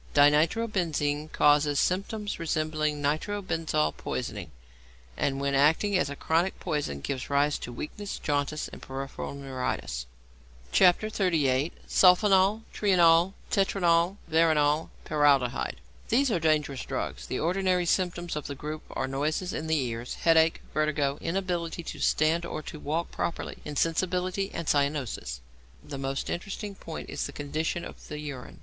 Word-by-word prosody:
=Dinitrobenzene= 155 -1 +2
causes 145 -1 +4
symptoms 205 +3 -1
resembling 155 -2 -1
nitro 155 +8 0
benzol 160 - 0
poisoning, - - -4 0.7
and 135 -1 0
when 140 0 0
acting 160 +9 +3
as 180 - +2
a 145 - -5
chronic 165 +6 0
poison 145 - -2
gives 130 - -4
rise 145 +1 +2
to 120 - -6
weakness, 200 +11 -6
jaundice, 145 0 -1
peripheral 135 +1 -6
neuritis. 130 - -3 0.7
XXXVIII. 175 -7 +3
SULPHONAL, 195 +3 +5
TRIONAL, 175 -2 +4 0.2
TETRONAL, 180 -2 +2
VERONAL, 160 -1 +3 0.2
PARALDEHYDE 140 -4 +2 0.3
These 255 +2 +3
are 180 - +1
dangerous 150 -4 +1
drugs. - - -4
The - - -2
ordinary 180 +1 +1
symptoms 175 -1 0
of 150 - -4
the 140 - -5
group 150 +3 -5
are 130 - -2
noises 155 +7 -1
in 160 - -4
the 160 0 +2
ears, 120 -3 -3
headache, 165 -1 +3
vertigo, 150 -2 0
inability 175 -2 -2
to - - -7
stand 160 +2 +2
or 155 - -5
to 155 - -8
walk 160 +4 -2
properly, 170 - -3
insensibility, 180 +5 0
and 170 -2 -5
cyanosis. 140 - -1 0.4
The 145 -2 -7
most 135 0 -2
interesting 200 +3 -4
point 165 -4 -8
is - - -2
the - - -8
condition 155 +4 -3
of - - -11
the 150 - -6
urine. 145 -4 -7
155 Hz, 135 wpm, -28 LUFS, 145-180 Hz, 0.7 s, SULPHONAL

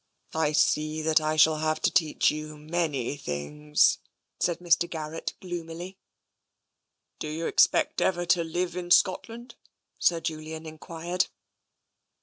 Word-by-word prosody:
" - - -28
I - - 0
see 155 +1 +1
that 160 0 +3
I 155 0 0
shall 155 0 +5
have 155 0 0
to - - +2
teach 155 -3 +3
you 155 0 -6
many 150 -4 -2
things," 150 - +1 0.4
said 175 - +1
Mr. 170 -1 +2
Garrett 160 -1 -5
gloomily. 175 +1 -7 0.6
" - - -54
Do - - -4
you 160 +2 -4
expect - - +3
ever 175 -2 +1
to 170 0 +3
live 175 +2 -2
in 180 -1 -5
Scotland? 225 +7 +2 0.3
" - - -56
Sir 170 -1 +3
Julian 160 0 -5
enquired. 165 +3 -3
160 Hz, 140 wpm, -27 LUFS, 155-175 Hz, 0.6 s, shall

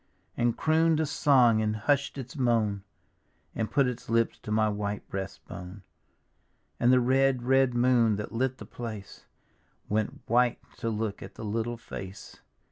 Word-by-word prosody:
And 120 -1 +1
croon'd 160 0 +3
a 160 - +2
song, 130 -6 +4
and 110 0 0
hush'd 140 +6 0
its 135 +3 -7
moan, 115 -7 +1 0.7
And 110 -1 -2
put 140 -2 +3
its 125 -1 -4
lips 115 0 +1
to 105 - -7
my 110 0 +3
white 105 0 -3
breast 95 -1 -6
bone; 90 +3 -9 1.0
And 120 - +4
the 130 - +6
red, 130 0 +2
red 130 0 +3
moon 120 -3 +3
that 105 +1 -5
lit 130 +2 -1
the - - -9
place 110 -4 -8 0.6
Went 110 0 -1
white 120 +1 +3 0.2
to 115 - -2
look 110 -2 -3
at - - -10
the 110 - -7
little 115 +3 -2
face. 95 -4 -9
115 Hz, 160 wpm, -28 LUFS, 105-130 Hz, 1.0 s, the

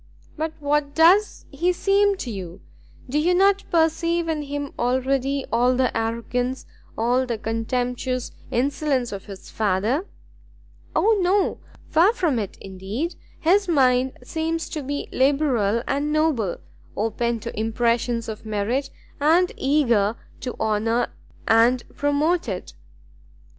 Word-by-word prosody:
"But 315 0 -3
what 290 0 0
does 365 +6 +4
he 340 +6 +1
seem 395 +2 +2
to 250 - -5
you? 185 -2 -7 0.5
Do 280 +4 0
you 350 +4 +2
not 395 +1 +4
perceive 335 +1 +1
in 315 -2 -1
him 285 0 -5
already 260 +2 0
all 245 +2 +3
the 255 -1 +1
arrogance, 235 +3 -2 0.3
all 245 +3 +1
the 235 -2 -2
contemptuous 245 +3 -2 0.2
insolence 270 0 0
of 200 -1 -7
his 195 -2 -11
father?" 220 - 0 0.9
"O 435 0 +3
no! 375 +2 +2 0.3
far 345 +8 +4
from 325 - 0
it 205 -3 -5
indeed; 195 - -4 0.3
his 380 +4 +3
mind 260 -5 +3
seems 325 +4 -2
to 310 - -4
be 285 +1 -4
liberal 260 -6 +2
and 285 +2 0
noble, 300 - +1 0.4
open 225 +2 -1
to - - -6
impressions 230 +1 0
of 220 -1 -6
merit, 220 +6 -1 0.3
and 335 +5 +4
eager 235 -7 +2 0.2
to 250 - -5
honour 220 +2 0 0.3
and 235 +2 +4
promote 290 +1 +1
it." 185 -2 -5
260 Hz, 125 wpm, -23 LUFS, 230-315 Hz, 0.9 s, does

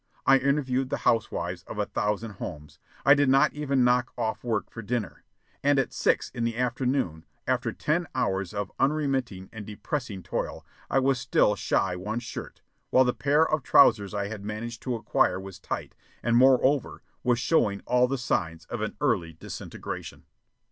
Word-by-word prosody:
I 135 0 +6
interviewed 135 -2 0
the - - -1
housewives 90 -6 0
of - - -7
a - - 0
thousand 105 +2 -2
homes. 75 0 -7 0.3
I 140 - +9
did 145 -2 +3
not 135 +3 +4
even 140 -3 +1
knock 125 0 +2
off 110 - -2
work 110 -6 -2
for 115 - -7
dinner. 115 -3 -3 0.4
And 145 0 +3
at 135 - 0
six - - +1
in 120 - -3
the 115 0 -1
afternoon, 125 - -1 0.2
after - - 0
ten - - -1
hours 95 -2 0
of 100 -2 -4
unremitting 135 -9 0
and 110 -2 -7
depressing 105 -1 -5
toil, - - -4 0.2
I - - +1
was 135 -1 +2
still - - +3
shy 90 - 0
one 105 +5 -4
shirt, 120 - -8 0.3
while 130 - +5
the 125 -1 +1
pair 150 +3 +3
of 155 -1 0
trousers 110 -7 +5
I 100 -1 -1
had 105 -1 -7
managed 110 +2 -5
to 125 -2 -2
acquire 95 -4 +1
was 95 -1 -9
tight - - -5 0.3
and, 120 0 +2
moreover, 130 +1 +3 0.2
was 125 -1 +3
showing 110 -7 +1
all 125 0 +3
the 135 +2 -1
signs 85 -9 -2
of - - -5
an - - -3
early 85 -1 +1
disintegration. 80 - -7
120 Hz, 175 wpm, -27 LUFS, 100-135 Hz, 0.4 s, I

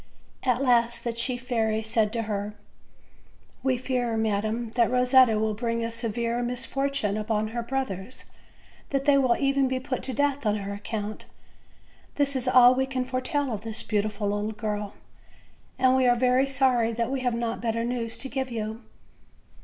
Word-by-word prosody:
At 255 0 +1
last 235 -2 +2
the 235 - -2
chief 245 +1 -3
fairy 220 -3 0
said 220 -1 +1
to 230 -1 -1
her: 210 -1 -3 1.1
"We 260 -1 +1
fear, 245 -2 -1
madam, 220 +2 -1
that 235 -1 +2
Eosetta 250 -2 +5
will 220 0 0
bring 230 +1 -2
a 230 - -3
severe 230 +1 -2
misfortune 250 -2 -1
upon 215 0 -1
her 235 +1 -3
brothers; 245 -3 -4 0.6
that 275 -1 -1
they 290 -1 +5
will 255 -3 +3
even 275 -1 +2
be 260 0 -1
put 260 0 -3
to 265 - -3
death 285 +2 0
on 210 - +2
her 200 -1 -4
account. 210 +1 -5 0.9
This 280 -1 +1
is 260 -1 -2
all 250 -1 +7
we 265 +1 0
can 260 -1 -2
foretell 260 +1 -1
of 205 - -4
this 225 +1 -5
beautiful 210 0 -1
little 205 +1 -2
girl, 210 -1 -4 0.8
and 260 0 +4
we 260 -1 +3
are 245 - +5
very 255 +2 +3
sorry 255 -4 +2
that 235 +2 -1
we 270 - -1
have 245 -2 0
not 235 0 -2
better 230 0 -1
news 235 -1 -2
to 270 - -1
give 265 -1 -3
you." 220 -1 -4
235 Hz, 175 wpm, -26 LUFS, 220-260 Hz, 1.1 s, all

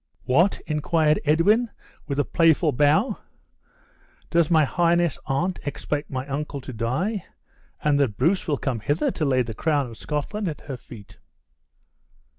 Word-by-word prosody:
"What!" 170 +10 +3
inquired 155 0 +1
Edwin, 205 +10 +3 0.4
with 140 - -3
a 145 - +3
playful 165 -2 +3
bow, 150 - +2 1.1
"does 170 -2 +3
my 160 -3 +4
highness 170 +1 +1
aunt 170 +7 -1
expect 145 +1 -3
my 130 -1 -4
uncle 145 +1 -4
to 130 0 -8
die, 160 - -1 0.6
and 145 -1 +3
that 125 -8 +1
Bruce 170 +9 +1
will 145 -3 +1
come 130 -4 -2
hither 145 +9 0
to 155 - -2
lay 130 -2 +2
the 115 -1 -6
crown 145 0 0
of 115 - -12
Scotland 170 +8 -3
at 155 - -5
her 140 - -6
feet?" 115 -4 -13
150 Hz, 150 wpm, -24 LUFS, 135-170 Hz, 1.1 s, my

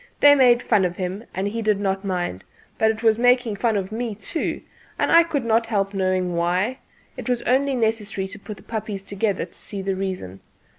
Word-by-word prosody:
They 290 0 +8
made 250 -3 +5
fun 210 -4 +3
of 180 -1 -1
him, 190 +4 -4
and 190 +1 -2
he 225 +3 -3
did 215 -2 +1
not 195 -1 -1
mind; 175 - -3 0.4
but 220 - +4
it 220 +1 -2
was 220 0 +4
making 245 -2 +3
fun 225 -1 +1
of 195 0 -3
me 225 -1 -3
too, 265 +9 -3 0.4
and - - +1
I 335 - +8
could 305 -7 -2
not 230 0 +2
help 200 -3 0
knowing 185 -2 0
why; 180 +9 0 0.4
it - - -6
was 245 -1 0
only 270 +2 +2
necessary 220 -4 -1
to 205 +2 -9
put 210 0 -8
the - - -16
puppies 215 -3 -5
together 200 0 -1
to - - -22
see 200 -2 -5
the 195 0 -1
reason. 185 - -4
210 Hz, 210 wpm, -23 LUFS, 190-235 Hz, 0.4 s, They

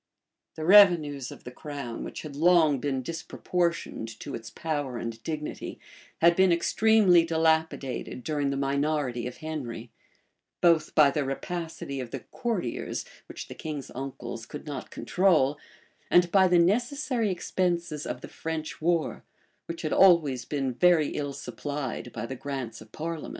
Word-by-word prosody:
The 155 - -4
revenues 165 -9 +6
of - - -12
the 125 - -8
crown, 140 -4 -6
which - - -7
had 150 -3 -8
long 160 -3 +4
been 135 -1 -2
disproportioned 170 -3 -2
to - - -6
its 115 -1 -6
power 145 -2 -3
and 115 -1 -5
dignity, 150 +1 -5 0.4
had 170 +1 +6
been 190 0 +5
extremely 190 0 +4
dilapidated 160 -6 0
during 145 -1 -1
the 140 - -1
minority 140 -3 0
of 125 - -8
Henry;[*] 125 -7 -5 0.7
both 165 -3 +3
by 145 -2 +6
the 145 +1 0
rapacity 160 0 -4
of 125 -2 -5
the 130 +1 -6
courtiers, 185 - -3 0.2
which - - -8
the - - -8
king's 150 -4 -6
uncles 120 -3 -6
could 150 - -8
not 145 -3 -6
control, 155 -7 +2 0.5
and 175 -1 +4
by 190 -2 +6
the 180 -1 +4
necessary 240 - +1
expenses 170 -4 -1
of 125 - -4
the - - -8
French 160 -1 -5
war, 170 0 0 0.4
which 165 0 -6
had 155 - -1
always 155 -10 +5
been 135 -3 -2
very 170 +1 +4
ill 145 -1 -3
supplied 140 -3 -5
by 115 0 -5
the 130 - -5
grants 130 -5 -5
of 110 0 -14
parliament. 165 0 -5
155 Hz, 150 wpm, -27 LUFS, 135-170 Hz, 0.7 s, revenues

